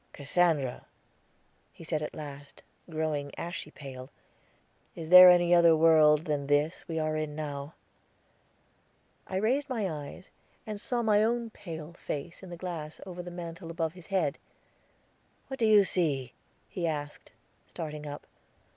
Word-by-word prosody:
"Cassandra," 145 -3 0 0.8
he - - -14
said 155 -2 -1
at 150 - -5
last, 145 -2 -10 0.3
growing 155 -3 -2
ashy 170 -2 -5
pale, 135 -3 -10 0.9
"is 160 0 -7
there 180 0 +12
any 175 -1 +5
other 170 -1 +6
world 155 -1 +5
than 145 -2 -2
this 145 +3 +1
we 165 - -4
are 155 -1 0
in 155 -1 -3
now?" 145 0 -5 1.5
I 190 - -5
raised 255 +9 +1
my 225 -6 -1
eyes, 155 +2 -8 0.3
and 210 -2 -6
saw 245 -2 -1
my 210 -1 +4
own 230 0 0
pale 165 -5 -8
face 170 0 -6
in 190 - -10
the 175 - -8
glass 165 -4 -6
over 180 -2 -7
the 175 - -8
mantel 170 -1 -8
above 165 -1 -2
his 180 -2 -13
head. 185 -7 0 1.1
"What 265 - -6
do 225 - +3
you 210 -2 +7
see?" 145 -10 -1 0.3
he 175 -2 -3
asked, 145 -2 -5 0.4
starting 150 -2 -6
up. 145 0 -7
165 Hz, 145 wpm, -29 LUFS, 150-180 Hz, 1.5 s, there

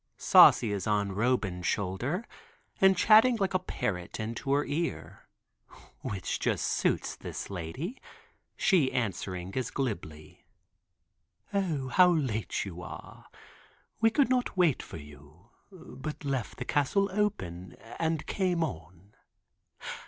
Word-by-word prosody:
Saucy 110 - +7
is 100 -1 -3
on 100 -2 +1
Roban's 100 -4 0
shoulder, 120 - -2 0.5
and 190 -1 +5
chatting 220 +5 +6
like 195 -3 -1
a 185 - +2
parrot 90 - -4
into 115 +5 -4
her 145 +1 +2
ear, 165 +3 -4 0.7
which 95 -5 -3
just - - 0
suits - - 0
this - - -7
lady, 100 - -5 0.6
she 175 - +3
answering 95 -5 -3
as 130 - -1
glibly. 80 - -5 1.1
"O, 160 -10 -1
how 180 +8 +6
late 130 -14 -1
you 90 -3 -7
are! - - -10 0.7
We 225 0 +5
could 265 +2 +2
not 250 -6 0
wait 170 -7 +3
for - - -9
you, 75 +7 -15 0.2
but 155 -5 -8
left 135 -5 -2
the - - -5
castle 150 +8 +1
open 95 - -2 0.2
and 160 -2 -1
came 180 -4 0
on. 90 - -7
130 Hz, 125 wpm, -29 LUFS, -, 1.1 s, Saucy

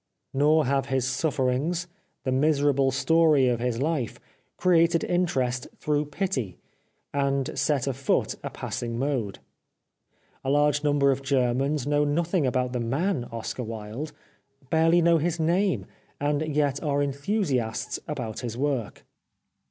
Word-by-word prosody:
Nor 150 +3 +4
have 135 +1 0
his 130 -2 0
sufferings, 135 +4 0 0.4
the 130 - -1
miserable 140 -1 +3
story 145 +1 +4
of 120 -2 +1
his 120 -1 -1
life, 140 -5 -1 0.4
created 170 -2 +3
interest 130 -9 0
through 150 0 0
pity, 145 - -3 0.6
and 140 -1 0
set 145 -5 +1
afoot 135 0 0
a - - -3
passing 115 -1 -4
mode. 125 -6 -1 1.1
A 135 - -2
large 145 +1 +3
number 145 -2 +3
of 135 0 -1
Germans 135 +1 +1
know 145 0 +2
nothing 160 +1 +1
about 125 0 0
the 125 - -1
man 135 +4 -1
Oscar 115 +2 -5
Wilde, 115 +5 -6 0.6
barely 165 +2 +4
know 170 -1 +5
his 170 +2 -1
name, 180 +4 +1 0.3
and 145 +2 0
yet 145 -2 +1
are 145 -2 +1
enthusiasts 140 - -1
about 125 -7 -4
his 120 -2 -5
work. 135 -5 -2
140 Hz, 130 wpm, -26 LUFS, 130-155 Hz, 1.1 s, know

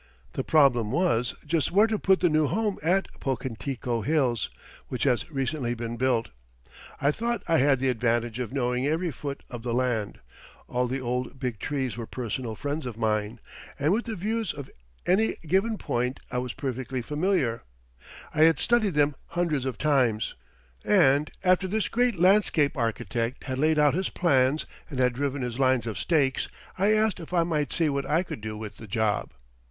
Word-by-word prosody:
The - - -2
problem 125 -8 +4
was, 130 -7 +1
just 155 -1 +1
where 205 +4 +6
to 220 -2 -1
put 190 -1 +3
the 175 - +4
new 155 -1 +3
home 210 +3 -1
at 185 +5 +2
Pocantico 125 -2 -3
Hills, 130 - +1 0.4
which 125 - -3
has 125 -6 +1
recently 135 -3 -2
been 115 0 -4
built. 120 -2 +1 0.7
I 140 - +3
thought 235 +7 -2
I 165 -1 +3
had 135 0 +4
the 135 0 +1
advantage 120 -1 0
of 125 -3 -3
knowing 125 0 0
every 165 +3 0
foot 140 0 -6
of 120 -2 -6
the 120 0 -2
land, 120 -5 -1 0.5
all 125 0 0
the 130 +2 -2
old 125 +1 -3
big 125 -5 -3
trees 130 -6 -2
were 115 -2 -5
personal 120 -1 -4
friends 145 +3 -3
of 115 -3 -6
mine, 110 0 -1 0.4
and 150 +5 +2
with 230 +4 0
the 225 -2 -4
views 215 +1 -2
of 140 -2 -8 0.3
any 205 +5 +2
given 195 +7 +1
point 125 -3 -2
I 125 - 0
was 125 -2 -4
perfectly 130 -2 -4
familiar 150 -6 0 0.7
I 155 - +1
had 165 0 +5
studied 225 -7 +2
them 145 0 +3
hundreds 160 -6 -1
of 130 -4 -3
times; 130 -8 +1 0.5
and 150 -7 +4
after 185 +1 +3
this 215 +3 -1
great 245 -3 +1
landscape 180 -6 +4
architect 115 0 -2
had 130 -2 -3
laid 155 +1 +3
out 150 -2 +4
his 185 +4 -1
plans 140 -3 +2 0.2
and 140 - -6
had 125 -1 +3
driven 140 +1 -2
his 125 0 -4
lines 130 -2 +3
of 110 -3 -4
stakes, 140 -6 +1 0.3
I 200 +3 +2
asked 215 -3 +2
if 165 +1 -9
I 170 -2 +4
might 150 -5 -1
see 165 - +2
what 140 -2 -1
I 160 +5 +2
could 140 - -7
do 110 0 -5
with 105 -1 -7
the 110 - -10
job. 105 +1 0
135 Hz, 185 wpm, -27 LUFS, 120-165 Hz, 0.7 s, where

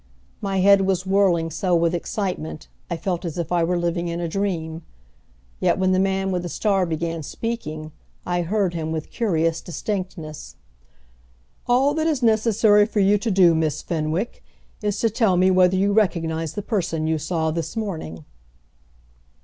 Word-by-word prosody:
My 195 -2 0
head 200 +1 +6
was 190 -1 0
whirling 190 -4 +2
so 180 +2 0
with 170 0 +2
excitement 175 -3 -4 0.2
I 170 - -2
felt 175 0 -2
as 170 -2 -5
if 170 -1 -3
I 175 -1 +2
were 175 +2 +1
living 170 0 -1
in 170 0 -3
a 170 - -2
dream. 165 -3 -2 0.8
Yet - - +2
when 185 0 +2
the 185 - +3
man 195 0 0
with 180 -1 -1
the 175 - -5
star 195 -1 +1
began 165 0 -2
speaking 155 -5 -5 0.3
I 175 0 0
heard 190 +1 0
him 160 -2 -3
with 160 -1 -4
curious 165 -8 0
distinctness. 180 -4 -5 1.1
"All 260 +4 +3
that 315 +1 0
is 295 -6 0
necessary 215 -2 +4
for 215 - -2
you 200 +1 +4
to 230 - -2
do, 185 -4 +5
Miss 160 -2 -1
Fenwick, 165 +6 -2 0.4
is 205 -2 -1
to 230 - +3
tell 210 -5 +2
me 185 +1 +4
whether 185 0 +4
you 200 +2 +2
recognize 165 -6 0
the 205 - -3
person 170 -8 -1
you 160 0 0
saw 160 +1 -1
this 165 +4 -4
morning." 160 - -5
180 Hz, 170 wpm, -23 LUFS, 165-200 Hz, 1.1 s, head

